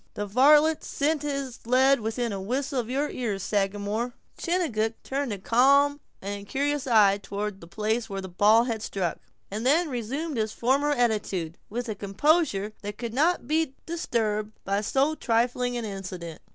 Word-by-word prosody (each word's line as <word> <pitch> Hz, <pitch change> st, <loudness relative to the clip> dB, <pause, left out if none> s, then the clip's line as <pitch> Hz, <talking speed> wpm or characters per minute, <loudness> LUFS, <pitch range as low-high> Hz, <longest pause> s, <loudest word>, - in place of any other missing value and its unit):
The 205 Hz, -, -2 dB
varlet 295 Hz, +8 st, +5 dB
sent 295 Hz, +1 st, 0 dB
his 275 Hz, -4 st, -3 dB
lead 265 Hz, +2 st, +4 dB
within 225 Hz, +1 st, -2 dB
whistle 265 Hz, +2 st, -1 dB
of 235 Hz, -1 st, -4 dB
your 280 Hz, +3 st, 0 dB
ears, 210 Hz, -6 st, -3 dB
Sagamore." 205 Hz, +4 st, -1 dB, 0.2 s
Chingachgook 280 Hz, -, 0 dB
turned 275 Hz, -2 st, -2 dB
a 205 Hz, -, -3 dB
calm 280 Hz, +8 st, +4 dB, 0.2 s
and 200 Hz, +1 st, -4 dB
incurious 280 Hz, +7 st, -2 dB
eye 205 Hz, -4 st, +5 dB
toward 200 Hz, 0 st, -5 dB
the 165 Hz, -, -11 dB
place 220 Hz, +5 st, -1 dB
where 195 Hz, -1 st, -4 dB
the 190 Hz, -, -6 dB
ball 210 Hz, +5 st, +4 dB
had 230 Hz, -3 st, -3 dB
struck, 185 Hz, -6 st, -2 dB, 0.3 s
and 215 Hz, +3 st, -3 dB
then 310 Hz, +6 st, +3 dB
resumed 265 Hz, +5 st, -3 dB
his 215 Hz, -1 st, -1 dB
former 275 Hz, +5 st, +1 dB
attitude, 210 Hz, -, 0 dB
with 240 Hz, +3 st, -4 dB
a 220 Hz, -, -2 dB
composure 210 Hz, -, +1 dB
that 205 Hz, 0 st, -6 dB
could 235 Hz, -2 st, -5 dB
not 310 Hz, 0 st, +2 dB
be 310 Hz, -2 st, 0 dB
disturbed 220 Hz, -10 st, -1 dB
by 200 Hz, +1 st, 0 dB
so 270 Hz, +7 st, +1 dB
trifling 245 Hz, -1 st, 0 dB
an 235 Hz, -, -3 dB
incident. 185 Hz, -5 st, -7 dB
235 Hz, 165 wpm, -26 LUFS, 205-275 Hz, 0.3 s, varlet